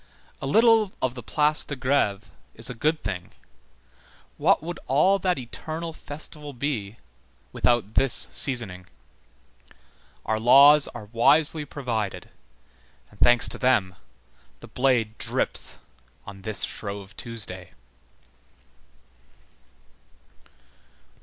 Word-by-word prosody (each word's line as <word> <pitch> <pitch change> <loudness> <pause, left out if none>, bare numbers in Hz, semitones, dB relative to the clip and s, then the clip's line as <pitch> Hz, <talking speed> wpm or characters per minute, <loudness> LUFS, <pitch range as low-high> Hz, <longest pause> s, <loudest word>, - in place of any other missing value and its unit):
A - - -4
little 225 +3 +4
of 130 -2 -1
the 125 - -8
Place 150 +5 +1
de 145 - -6
Grève 125 -6 0 0.3
is 115 +2 -5
a - - -5
good 150 +6 -1
thing. 95 -4 -5 1.0
What - - +2
would 170 +1 -6
all 170 +9 +3
that 185 -2 0
eternal 160 +6 -6
festival 150 -1 -9
be 120 -6 -4 0.5
without 120 -3 0
this 135 -2 +2
seasoning? 105 -9 +1 1.4
Our 110 0 -1
laws 140 +5 +7
are 115 -3 -8
wisely 150 +5 +3
provided, 120 -8 -4 0.8
and 105 - -20
thanks 120 0 +4
to - - -6
them, 110 -8 +2 0.7
this - - -14
blade 120 -4 0
drips - - -1 0.5
on 100 -1 -11
this 110 +1 0
Shrove 100 -1 -5
Tuesday. 100 -6 -7
125 Hz, 105 wpm, -25 LUFS, 110-150 Hz, 1.4 s, laws